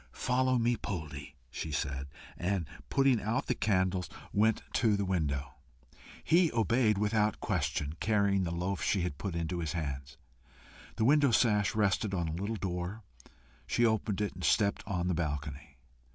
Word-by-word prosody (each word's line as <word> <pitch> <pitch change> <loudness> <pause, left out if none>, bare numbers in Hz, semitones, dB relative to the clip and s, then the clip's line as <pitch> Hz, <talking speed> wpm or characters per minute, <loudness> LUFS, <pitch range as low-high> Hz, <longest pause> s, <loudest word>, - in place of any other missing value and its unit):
"Follow 130 0 +2
me, 120 +1 +2
Poldie," 75 -9 -6 0.2
she 80 - -5
said, 70 -1 -2 0.3
and 90 -1 -1 0.2
putting 135 -4 +3
out 110 +6 -1
the - - +1
candles, 95 -5 0 0.2
went 110 +1 +2
to 110 -4 +3
the 100 - -1
window. 70 -8 -1 0.7
He 170 0 +4
obeyed 115 -1 +2
without 105 0 +1
question, 75 0 -1
carrying 100 -2 +2
the 85 - -1
loaf 90 +3 -2
she 100 - +1
had 85 -5 -3
put 95 -4 -3
into 85 +1 -2
his 80 -3 -2
hands. 70 -4 -4 0.8
The 110 - +1
window 145 +1 +5
sash 105 -4 +3
rested 105 -1 +1
on 85 -3 -1
a - - -2
little 100 +6 -2
door; 95 +2 -4 0.6
she 120 - +2
opened 110 -2 0
it, 105 - -1
and 90 - -9
stepped 100 +7 +2
on 90 -3 -1
the 90 - +1
balcony. 75 -3 -4
95 Hz, 160 wpm, -31 LUFS, 85-110 Hz, 0.8 s, window